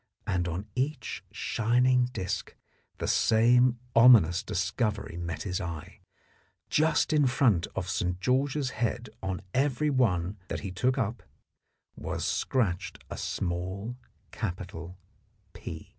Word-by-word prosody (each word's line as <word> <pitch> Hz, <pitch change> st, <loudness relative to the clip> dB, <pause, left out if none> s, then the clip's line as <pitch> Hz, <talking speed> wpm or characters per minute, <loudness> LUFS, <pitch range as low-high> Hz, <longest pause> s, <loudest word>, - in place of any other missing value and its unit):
And 90 Hz, -2 st, 0 dB
on 90 Hz, +4 st, -3 dB
each 140 Hz, +5 st, -2 dB
shining 125 Hz, +2 st, +2 dB
disc 100 Hz, -5 st, -4 dB, 0.4 s
the -, -, -3 dB
same 120 Hz, +2 st, +4 dB, 0.2 s
ominous 115 Hz, -8 st, +7 dB
discovery 100 Hz, 0 st, -2 dB
met 85 Hz, -1 st, -4 dB
his 95 Hz, 0 st, -2 dB
eye: 85 Hz, -4 st, -6 dB, 0.7 s
just 155 Hz, +1 st, +3 dB
in 145 Hz, -3 st, +4 dB
front 120 Hz, -9 st, +3 dB
of 90 Hz, -, -2 dB
St. 90 Hz, 0 st, -1 dB
George's 130 Hz, +5 st, +1 dB
head 115 Hz, -1 st, -2 dB
on 95 Hz, -1 st, -3 dB
every 145 Hz, +2 st, +1 dB
one 100 Hz, -7 st, +1 dB
that -, -, -4 dB
he 100 Hz, -, -5 dB
took 125 Hz, +8 st, +1 dB
up 115 Hz, -2 st, -1 dB, 0.7 s
was -, -, -4 dB
scratched 95 Hz, -8 st, 0 dB
a -, -, -3 dB
small 95 Hz, +6 st, -3 dB, 0.4 s
capital 90 Hz, -4 st, -5 dB, 0.3 s
" 100 Hz, -3 st, -39 dB
P." -, -, -8 dB
105 Hz, 125 wpm, -29 LUFS, 90-125 Hz, 0.7 s, ominous